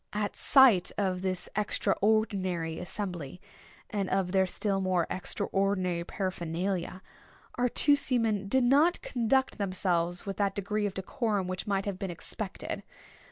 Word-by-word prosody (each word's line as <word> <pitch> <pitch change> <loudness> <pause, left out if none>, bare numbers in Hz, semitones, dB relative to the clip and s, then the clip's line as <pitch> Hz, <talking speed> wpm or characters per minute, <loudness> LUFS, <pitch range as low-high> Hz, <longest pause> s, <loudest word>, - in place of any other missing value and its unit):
At 210 0 -2
sight 250 -10 +5
of 185 -3 0
this 185 -1 -2
extraordinary 195 -5 0
assembly, 180 -5 -5 0.5
and 200 -3 -1
of 190 -1 0
their 190 0 +3
still 195 +1 -1
more 185 -3 +1
extraordinary 185 -2 -1
paraphernalia, 185 0 -3 0.5
our 245 0 +1
two 290 +4 +4
seamen 225 -7 +1
did 260 +5 +2
not 290 +8 +4
conduct 250 +1 +1
themselves 180 -3 -1
with 195 -1 -4
that 200 -2 0
degree 205 +1 -1
of 195 - -6
decorum 205 0 -1
which 185 +3 -4
might 195 -1 0
have 200 -2 -3
been 195 -2 -3
expected. 170 - -5
195 Hz, 135 wpm, -29 LUFS, 185-215 Hz, 0.5 s, sight